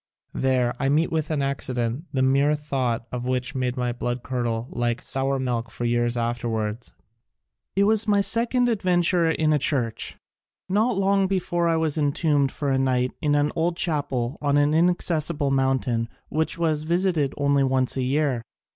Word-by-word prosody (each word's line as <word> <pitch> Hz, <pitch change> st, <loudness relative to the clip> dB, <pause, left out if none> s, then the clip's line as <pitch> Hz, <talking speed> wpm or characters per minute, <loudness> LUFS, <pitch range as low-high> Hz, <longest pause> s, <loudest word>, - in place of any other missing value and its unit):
There 130 Hz, -2 st, +1 dB
I 135 Hz, -, +1 dB
met 155 Hz, +4 st, +2 dB
with 160 Hz, -2 st, -1 dB
an 150 Hz, -3 st, 0 dB
accident, 130 Hz, 0 st, -2 dB
the 130 Hz, -2 st, 0 dB
mere 140 Hz, +3 st, +3 dB
thought 130 Hz, -6 st, -2 dB
of 125 Hz, -1 st, -4 dB
which 125 Hz, +1 st, -1 dB
made 125 Hz, -1 st, -2 dB
my 125 Hz, -1 st, 0 dB
blood 120 Hz, 0 st, -3 dB
curdle 120 Hz, -2 st, -2 dB
like 120 Hz, 0 st, -2 dB
sour 135 Hz, +1 st, 0 dB
milk 120 Hz, -3 st, -2 dB
for 120 Hz, -, -5 dB
years 120 Hz, 0 st, +1 dB
afterwards. 115 Hz, -1 st, -3 dB, 0.8 s
It 200 Hz, -, +3 dB
was 220 Hz, +1 st, +3 dB
my 205 Hz, -1 st, +3 dB
second 240 Hz, +4 st, +2 dB
ad 225 Hz, -4 st, 0 dB
venture 175 Hz, -2 st, +2 dB
in 155 Hz, -1 st, +2 dB
a 150 Hz, -, +2 dB
church. 120 Hz, -5 st, -1 dB, 0.5 s
Not 210 Hz, +4 st, +1 dB
long 195 Hz, 0 st, +2 dB
before 175 Hz, -2 st, 0 dB
I 165 Hz, -, +2 dB
was 160 Hz, -2 st, 0 dB
entombed 145 Hz, -1 st, +1 dB
for 145 Hz, -, -3 dB
a 135 Hz, -, +2 dB
night 130 Hz, -1 st, +1 dB
in 145 Hz, -1 st, +2 dB
an 145 Hz, 0 st, +2 dB
old 170 Hz, +1 st, 0 dB
chapel 135 Hz, -7 st, -1 dB
on 145 Hz, -1 st, +2 dB
an 145 Hz, +1 st, +3 dB
inaccessible 160 Hz, -3 st, +1 dB
mountain 130 Hz, -4 st, 0 dB, 0.2 s
which 160 Hz, +3 st, -1 dB
was 160 Hz, -3 st, 0 dB
visited 170 Hz, -3 st, 0 dB
only 140 Hz, -1 st, +2 dB
once 130 Hz, -1 st, +1 dB
a 135 Hz, -, -1 dB
year. 135 Hz, -1 st, 0 dB
140 Hz, 175 wpm, -24 LUFS, 125-160 Hz, 0.8 s, mere